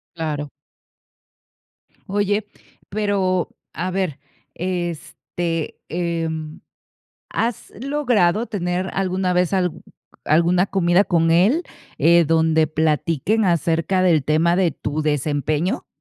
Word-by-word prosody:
Claro. 150 Hz, -3 st, -3 dB, 1.6 s
Oye, 205 Hz, +1 st, 0 dB, 0.4 s
pero, 195 Hz, -3 st, 0 dB, 0.2 s
a 180 Hz, +4 st, -3 dB
ver, 185 Hz, -6 st, -2 dB, 0.3 s
este, 175 Hz, -2 st, -4 dB
em, 165 Hz, -1 st, -3 dB, 0.7 s
¿has 230 Hz, -1 st, -3 dB
logrado 245 Hz, -7 st, +1 dB
tener 180 Hz, -2 st, -2 dB
alguna 185 Hz, -1 st, 0 dB
vez 180 Hz, 0 st, +1 dB
al 180 Hz, -3 st, +1 dB, 0.5 s
alguna 170 Hz, +4 st, +3 dB
comida 185 Hz, 0 st, +3 dB
con 165 Hz, -3 st, +2 dB
él, 200 Hz, -, +4 dB, 0.4 s
eh, 170 Hz, 0 st, +5 dB
donde 160 Hz, 0 st, +3 dB
platiquen 160 Hz, +7 st, +1 dB
acerca 170 Hz, +1 st, +1 dB
del 165 Hz, -6 st, +3 dB
tema 165 Hz, +3 st, +2 dB
de 185 Hz, -2 st, +3 dB
tu 145 Hz, +2 st, -3 dB
desempeño? 150 Hz, +3 st, -1 dB
175 Hz, 95 wpm, -21 LUFS, 160-190 Hz, 1.6 s, eh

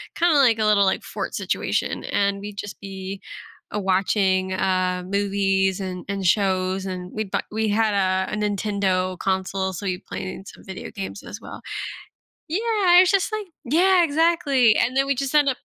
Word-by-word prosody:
kinda 340 Hz, -2 st, +3 dB
like 235 Hz, -5 st, +4 dB
a 215 Hz, -, +2 dB
little, 205 Hz, -2 st, +4 dB
like, 190 Hz, -, 0 dB
fort -, -, -5 dB
situation, -, -, -1 dB
and 200 Hz, 0 st, 0 dB
we'd 205 Hz, 0 st, -8 dB
just 205 Hz, 0 st, -6 dB
be, 195 Hz, 0 st, -7 dB, 0.5 s
uh, 210 Hz, -, 0 dB
watching, 190 Hz, 0 st, +1 dB
uh, 185 Hz, -1 st, 0 dB
movies 195 Hz, -1 st, +1 dB
and 180 Hz, -2 st, -5 dB
and 200 Hz, -1 st, -3 dB
shows, 190 Hz, 0 st, +1 dB
and 180 Hz, -1 st, -5 dB
we'd 215 Hz, -2 st, -4 dB
bought -, -, 0 dB
we 220 Hz, 0 st, 0 dB
had 215 Hz, +1 st, +2 dB
a 190 Hz, -1 st, +1 dB
a -, -, 0 dB
Nintendo 200 Hz, -3 st, 0 dB
console, 190 Hz, 0 st, -1 dB
so 180 Hz, -, -6 dB
we 185 Hz, -2 st, -1 dB
played -, -, -7 dB
in 185 Hz, +1 st, -7 dB
some -, -, -13 dB
video 190 Hz, -1 st, -7 dB
games 195 Hz, -1 st, -6 dB
as 215 Hz, -, -9 dB
well. -, -, -9 dB, 0.9 s
Yeah, 390 Hz, -1 st, +4 dB
it's 365 Hz, -1 st, +5 dB
just 395 Hz, +2 st, +1 dB
like 430 Hz, -1 st, -3 dB, 0.2 s
Yeah, 350 Hz, +6 st, +4 dB
exactly, 290 Hz, -7 st, +3 dB
and 250 Hz, -, +1 dB
then 270 Hz, 0 st, +3 dB
we'd 275 Hz, -, 0 dB
just 275 Hz, +1 st, -2 dB
end 290 Hz, -2 st, +5 dB
up 255 Hz, -, +1 dB
200 Hz, 185 wpm, -23 LUFS, 190-255 Hz, 0.9 s, it's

